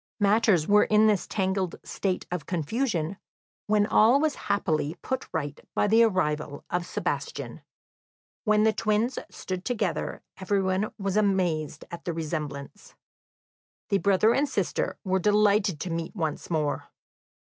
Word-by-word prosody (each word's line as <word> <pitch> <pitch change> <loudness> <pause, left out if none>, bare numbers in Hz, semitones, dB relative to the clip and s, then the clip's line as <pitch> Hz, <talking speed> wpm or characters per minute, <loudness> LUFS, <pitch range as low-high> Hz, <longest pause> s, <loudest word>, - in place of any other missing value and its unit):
Matters 205 -5 +3
were 210 +1 +5
in 215 0 +4
this 210 -3 +2
tangled 190 -3 -1
state 190 -2 -2
of 180 -5 -4
confusion, 180 - -1 0.5
when 210 -1 +3
all 225 +5 +5
was 310 0 +1 0.2
happily 160 -6 0
put 260 - -3
right 145 -1 -3 0.2
by - - +3
the 220 +3 +5
arrival 155 -9 0
of 175 0 -1
Sebastian. - - -4 0.8
When 215 -1 +3
the 220 0 +4
twins 220 +4 0
stood 185 -1 -5
together 215 -7 -2 0.2
everyone 195 +1 0
was 195 -1 -1
amazed 180 -8 0
at 170 - -8
the 175 - -2
resemblance. 155 +1 -5 0.9
The 200 -2 +2
brother 200 +3 +4
and 285 +2 +1
sister 200 -8 -1
were 190 -1 +1
delighted 205 -3 +3
to 180 - -3
meet 165 +3 -4
once 160 -6 -3
more. 155 -3 -1
195 Hz, 140 wpm, -27 LUFS, 165-210 Hz, 0.9 s, were